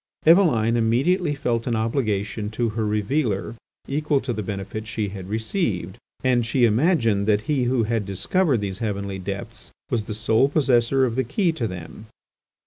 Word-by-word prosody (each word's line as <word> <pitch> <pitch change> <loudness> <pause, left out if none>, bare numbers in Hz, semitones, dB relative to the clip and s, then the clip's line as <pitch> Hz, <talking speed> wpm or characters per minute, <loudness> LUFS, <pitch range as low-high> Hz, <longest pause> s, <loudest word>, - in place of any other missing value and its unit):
Eveline 155 - +5
immediately 145 +9 +2
felt 120 -4 -1
an 120 - +1
obligation 110 -3 -1
to 115 +2 -1
her 110 0 -2
revealer 105 +1 -1 0.3
equal 150 0 +1
to 125 - -3
the 110 - -3
benefit 100 +2 -5
she 110 -2 -2
had 95 -1 -8
received, 110 - -2 0.3
and 125 -2 +3
she 120 +2 +2
imagined 115 - +2
that 105 -1 +3
he 140 -1 0
who 120 -1 +1
had 115 0 0
discovered 115 - 0
these 95 -1 -4
heavenly 100 -3 -3
depths 100 +1 -6 0.2
was 110 -3 0
the 105 - -5
sole 110 +4 +2
possessor 130 -3 +3
of 115 -3 -2
the 130 - +1
key 170 - +1
to 125 -8 -2
them. 90 +3 -9
115 Hz, 165 wpm, -23 LUFS, 105-130 Hz, 0.3 s, Eveline